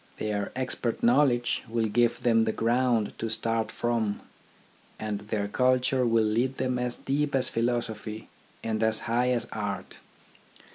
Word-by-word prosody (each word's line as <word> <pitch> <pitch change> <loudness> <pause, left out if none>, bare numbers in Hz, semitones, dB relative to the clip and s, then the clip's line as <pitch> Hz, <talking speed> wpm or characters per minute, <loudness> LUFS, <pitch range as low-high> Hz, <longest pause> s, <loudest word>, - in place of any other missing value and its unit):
Their 105 -1 -2
ex 130 0 -1
pert 120 -2 -3
knowledge 120 -1 +3
will 115 0 0
give 115 +2 +2
them 115 -2 +4
the 110 - +1
ground 115 -1 +1
to 115 - -2
start 110 0 0
from, 115 -3 -1 0.8
and 105 -2 -3
their 105 0 -2
culture 130 +2 +2
will 115 -1 +3
lead 120 +5 +1
them 125 -1 0
as 125 0 -2
deep 145 +1 -1
as 130 - +2
philosophy 115 -2 -2 0.4
and 110 -1 -1
as 110 0 +2
high 120 +2 +1
as 125 -2 +1
art. 100 -4 -4
115 Hz, 150 wpm, -28 LUFS, 110-125 Hz, 0.8 s, them